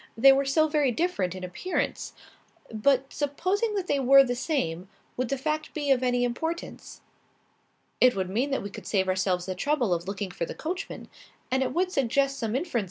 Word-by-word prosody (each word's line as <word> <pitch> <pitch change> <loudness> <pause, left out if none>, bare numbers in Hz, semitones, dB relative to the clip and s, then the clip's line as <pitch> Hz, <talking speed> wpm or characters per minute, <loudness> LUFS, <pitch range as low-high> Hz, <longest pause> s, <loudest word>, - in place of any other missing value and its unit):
They 270 +4 +8
were 275 +1 +2
so 310 +3 +3
very 295 -4 +2
different 225 - -1
in 185 - -8
appearance. 180 - -3 0.6
But 265 +4 +1
supposing 370 +10 -1
that 390 -3 -1
they 285 -5 0
were 275 +1 +7
the 245 -2 -2
same; 195 - -2 0.3
would 255 -1 -2
the 275 - 0
fact 305 +3 -3
be 290 -2 0
of 260 -2 +3
any 245 -1 +1
importance?" 320 +8 -4 1.0
"It 255 0 +5
would 190 -1 -1
mean 235 +9 -1
that 275 - -1
we 200 - -6
could - - -10
save 190 -2 +1
ourselves 185 -1 0
the 190 - -3
trouble 245 0 0
of 170 +1 -3
looking 195 -1 -4
for 170 - -3
the - - -7
coachman. 350 +4 -5
260 Hz, 165 wpm, -27 LUFS, 195-300 Hz, 1.0 s, They